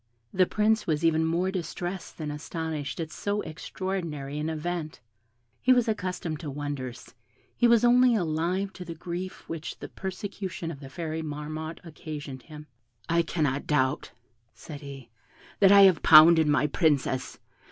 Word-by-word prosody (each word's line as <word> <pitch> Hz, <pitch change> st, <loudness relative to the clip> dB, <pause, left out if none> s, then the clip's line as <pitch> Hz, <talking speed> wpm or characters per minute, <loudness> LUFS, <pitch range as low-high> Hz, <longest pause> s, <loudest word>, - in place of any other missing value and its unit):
The 185 Hz, -1 st, +3 dB
Prince 215 Hz, +1 st, +1 dB
was 155 Hz, 0 st, 0 dB
even 160 Hz, -1 st, +3 dB
more 175 Hz, +3 st, 0 dB
distressed 180 Hz, 0 st, -5 dB
than 155 Hz, -2 st, -4 dB
astonished 155 Hz, -1 st, -5 dB
at 160 Hz, -1 st, -4 dB
so 205 Hz, +3 st, -2 dB
extraordinary 155 Hz, -4 st, -5 dB
an 155 Hz, +1 st, -2 dB
event. 160 Hz, 0 st, -4 dB, 0.6 s
He 255 Hz, -, +4 dB
was 245 Hz, -2 st, +2 dB
accustomed 180 Hz, -7 st, -3 dB
to 155 Hz, -, -6 dB
wonders 135 Hz, -3 st, -6 dB, 0.4 s
he 240 Hz, -, +4 dB
was 235 Hz, 0 st, +5 dB
only 245 Hz, 0 st, +5 dB
alive 180 Hz, +2 st, -1 dB
to 180 Hz, -, -8 dB
the 165 Hz, -1 st, -7 dB
grief 175 Hz, +3 st, -6 dB
which 165 Hz, 0 st, -6 dB
the -, -, -8 dB
persecution 190 Hz, -2 st, -5 dB
of 145 Hz, -, -9 dB
the 135 Hz, -2 st, -10 dB
Fairy 160 Hz, +1 st, -4 dB
Marmotte 155 Hz, +1 st, -6 dB
occasioned 150 Hz, -5 st, -8 dB
him. 150 Hz, +2 st, -11 dB, 0.4 s
"I 170 Hz, 0 st, +3 dB
cannot 150 Hz, -4 st, -1 dB
doubt," 130 Hz, -1 st, +1 dB, 0.5 s
said 145 Hz, -3 st, -10 dB
he, 135 Hz, -4 st, -10 dB, 0.5 s
"that 195 Hz, -1 st, +6 dB
I 200 Hz, 0 st, +9 dB
have 190 Hz, -4 st, +6 dB
pounded 160 Hz, 0 st, +8 dB
my 150 Hz, 0 st, +3 dB
Princess. 140 Hz, -4 st, 0 dB
160 Hz, 150 wpm, -27 LUFS, 150-185 Hz, 0.6 s, I